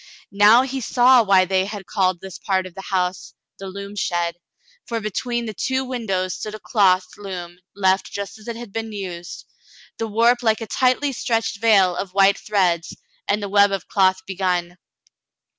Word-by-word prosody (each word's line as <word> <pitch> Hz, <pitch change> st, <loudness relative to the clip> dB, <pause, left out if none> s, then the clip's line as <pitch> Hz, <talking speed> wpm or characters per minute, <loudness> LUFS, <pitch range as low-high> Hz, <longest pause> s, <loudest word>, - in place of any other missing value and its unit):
Now 210 Hz, +5 st, +6 dB
he 265 Hz, 0 st, -4 dB
saw 250 Hz, +1 st, +5 dB
why 195 Hz, -3 st, +4 dB
they 190 Hz, 0 st, +1 dB
had 205 Hz, -1 st, -7 dB
called 185 Hz, -3 st, 0 dB
this 190 Hz, -1 st, -9 dB
part 190 Hz, -2 st, 0 dB
of 185 Hz, -, -10 dB
the 195 Hz, -, -8 dB
home 180 Hz, -2 st, +1 dB, 0.5 s
the 195 Hz, -, -7 dB
loom 200 Hz, +1 st, -8 dB
shed, 175 Hz, -3 st, -1 dB, 0.5 s
for 230 Hz, -1 st, -2 dB
between 235 Hz, +3 st, -3 dB
the 220 Hz, -, -5 dB
two 260 Hz, +5 st, -1 dB
windows 195 Hz, -8 st, -2 dB
stood 215 Hz, +4 st, -6 dB
a -, -, -9 dB
cloth 190 Hz, -5 st, +3 dB
loom 180 Hz, -3 st, -7 dB, 0.2 s
left 190 Hz, -1 st, +1 dB
just 200 Hz, +1 st, -6 dB
as 215 Hz, -, -15 dB
it 235 Hz, -, -4 dB
had 230 Hz, -3 st, -10 dB
been 225 Hz, -1 st, -4 dB
used, 180 Hz, -4 st, -7 dB, 0.5 s
the 225 Hz, -, -2 dB
warp 235 Hz, +3 st, +3 dB
like 220 Hz, -2 st, +2 dB
a -, -, -3 dB
tightly 255 Hz, +4 st, +1 dB
stretched 230 Hz, -3 st, -1 dB
veil 195 Hz, -6 st, +4 dB
of 190 Hz, 0 st, -5 dB
white 195 Hz, 0 st, +4 dB
threads, 180 Hz, -5 st, 0 dB, 0.3 s
and 205 Hz, +1 st, 0 dB
the -, -, -2 dB
web 200 Hz, 0 st, +4 dB
of 195 Hz, -3 st, -3 dB
cloth 190 Hz, -1 st, +2 dB
begun. 180 Hz, -2 st, -2 dB
200 Hz, 180 wpm, -21 LUFS, 185-225 Hz, 0.5 s, Now